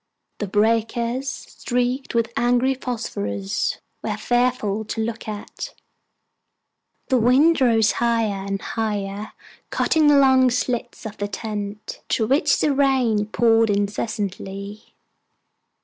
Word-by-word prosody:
The 205 - -2
breakers, 230 +5 +1
streaked 250 +1 -3
with 230 0 +1
angry 245 +2 +2
phosphorus, 100 - -3 0.2
were - - -3
fearful 240 -4 0
to 225 - -5
look 230 0 -5
at. 210 -1 -7 1.3
The 260 -2 +3
wind 270 +7 +4
rose 225 -4 +4
higher 225 -4 0
and 195 0 -3
higher, 205 -1 -3 0.4
cutting 315 -2 +2
long 265 -3 +6
slits 245 -1 -2
in 215 - -5
the 205 - -1
tent, 205 0 -6
through 220 - +1
which 285 +2 +3
the 295 - +2
rain 260 -7 +2
poured 225 0 +3
incessantly. 200 0 -3
230 Hz, 110 wpm, -22 LUFS, 205-250 Hz, 1.3 s, long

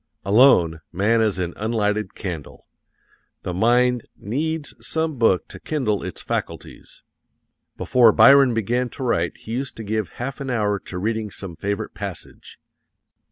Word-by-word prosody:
Alone, 95 - +5
man 105 +5 +2
is 110 -4 +1
an 90 -2 -3
unlighted 110 -1 -1
candle. 85 -7 -7 0.8
The 90 - -4
mind 120 +4 +2
needs 150 +8 -3
some 160 -4 -3
book 105 -6 +3
to - - -9
kindle 125 -10 -1
its 95 - -5
faculties. - - -6 0.7
Before 120 -3 +5
Byron 135 0 +6
began 120 +3 0
to 135 - -5
write 85 -9 0
he 110 - -10
used 130 +3 -3
to 110 - -7
give 110 -1 -3
half 135 +3 -5
an 135 - -4
hour 105 -4 0
to 90 - -8
reading 110 +2 -2
some 95 -3 -8
favorite 100 +5 -4
passage. - - -8
110 Hz, 145 wpm, -22 LUFS, 100-125 Hz, 0.8 s, Byron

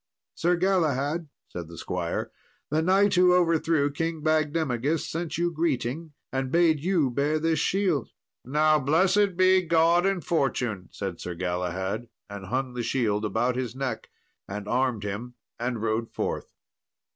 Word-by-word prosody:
"Sir 175 +2 +1
Galahad," 165 -4 0 0.2
said 85 -2 -7
the 85 0 -11
squire, 85 -2 -3 0.4
"the 155 +1 +2
knight 195 +4 +3
who 180 0 +5
overthrew 165 -4 +2
King 165 +1 -3
Bagdemagus 155 -2 0
sent 165 -1 -3
you 175 0 +1
greeting, 160 -1 -2 0.2
and 135 -1 -2
bade 165 -2 +4
you 165 -5 +1
bear 145 +5 +1
this 160 0 +1
shield." 185 -4 +1 0.3
"Now 155 +3 +3
blessed 185 +7 +2
be 185 0 +5
God 170 +1 +3
and 195 -3 -1
fortune," 120 - -1
said 95 -4 -5
Sir 90 - -5
Galahad, 90 +5 -2 0.2
and 100 -2 -7
hung 130 +3 -2
the 125 - -3
shield 110 -4 0
about 120 +4 0
his 125 -2 -3
neck, 130 -4 -4 0.4
and 100 +1 -6
armed 125 -3 0
him, 110 +5 -5 0.2
and 120 -2 -2
rode 115 +1 -1
forth. - - -3
145 Hz, 145 wpm, -26 LUFS, 115-170 Hz, 0.4 s, who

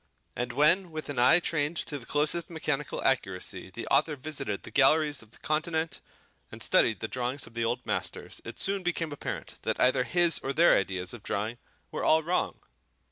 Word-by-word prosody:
And 125 0 -2
when 170 +7 +3
with 155 -2 -6
an 140 - -2
eye 130 +8 +6
trained 165 -1 -1
to 145 -2 -3
the 115 - -13
closest 150 +3 +1
mechanical 150 -3 -3
accuracy 95 -7 -1
the 115 +4 -7
author 150 +2 +3
visited 135 -7 -4
the - - -9
galleries 145 +1 +4
of 110 - -15
the - - -15
Continent 160 +1 -1 0.5
and - - -7
studied 110 - +3
the 110 - -2
drawings 125 +3 -3
of 115 - -15
the 115 0 -2
old 120 +2 -2
masters, - - -4
it - - -8
soon 195 0 +1
became 170 -3 -2
apparent 145 - -6
that - - -2
either 125 0 +4
his 170 +6 +3
or 135 - -3
their 170 +4 +6
ideas 95 -2 -1
of 120 - -9
drawing 110 +4 -3 0.3
were - - -4
all 160 0 +4
wrong. 175 +3 -1
145 Hz, 190 wpm, -29 LUFS, 120-160 Hz, 0.5 s, eye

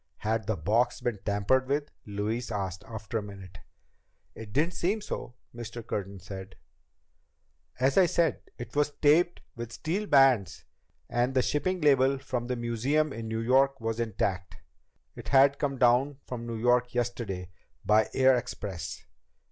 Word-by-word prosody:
"Had 110 0 -1
the 110 - 0
box 120 +4 +1
been 115 -5 -2
tampered 105 +6 +1
with?" 145 +2 -1 0.2
Louise 105 +4 -3
asked, 95 -3 -3
after 110 +1 -4
a - - -5
minute. 95 -2 -10 0.7
"It 110 -2 -10
didn't 160 +9 +1
seem 195 +7 0
so," 125 - -6 0.2
Mr. 120 -1 -7
Curtin 100 -1 -4
said. 95 +1 -9 1.2
"As 135 +6 +3
I 185 - +6
say, 165 -3 +2 0.2
it 120 +1 -8
was 145 0 +1
taped 170 +4 +4
with 115 0 -6
steel 185 - -3
bands, 135 - +4 0.4
and 120 +2 0
the 130 - +4
shipping 185 +5 0
label 135 -2 +4
from 130 -3 -4
the 125 - -1
museum 125 +6 0
in 115 0 -6
New 110 0 -2
York 135 +3 +3
was 115 0 -3
intact. 100 -4 -2 0.6
It - - -10
had 140 +1 +5
come 140 -2 -1
down 130 +3 +3
from 120 -2 -6
New 115 -1 -4
York 120 +1 +2
yesterday 115 -7 -3 0.3
by 110 +1 +4
air 130 0 +5
express 95 - -5
120 Hz, 155 wpm, -28 LUFS, 105-135 Hz, 1.2 s, I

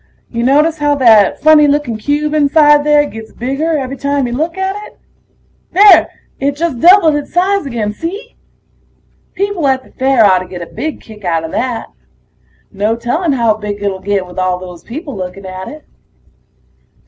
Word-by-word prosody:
Ya 235 0 -2
notice 300 +5 +2
how 290 0 +1
that 225 -7 +4
funny 305 -1 +6
looking 285 -5 0
cube 290 +7 -2
inside 295 0 +4
there 295 0 +3
gets 225 -5 -10
bigger 285 +6 -2
every 270 -1 -4
time 280 0 -1
you 240 - -4
look 320 +7 -3
at 380 +1 -2
it? - - -20 0.8
There... 405 +2 +6 0.3
it 280 +1 -1
just 310 -5 -2
doubled 345 0 +6
its 295 -1 -4
size 375 -2 0
again, 220 -5 -3
see? 400 - -7 1.0
People 395 -6 -1
at 260 -1 0
the - - -21
fair 265 -3 +2
oughtta 185 -2 +2
get 175 -2 -7
a - - -13
big 310 0 -5
kick 215 -2 -14
outta 165 -2 -2
that. 240 +4 -3 0.8
No 210 +2 -1
telling 280 +8 -1
how 235 -4 +2
big 210 -1 -6
it'll 195 -2 -2
get 200 -1 -2
with 180 +1 -8
all 185 -1 0
those 180 -2 -11
people 285 +3 -7
looking 185 +1 -7
at 185 0 -7
it. 300 0 -11
270 Hz, 170 wpm, -14 LUFS, 210-305 Hz, 1.0 s, funny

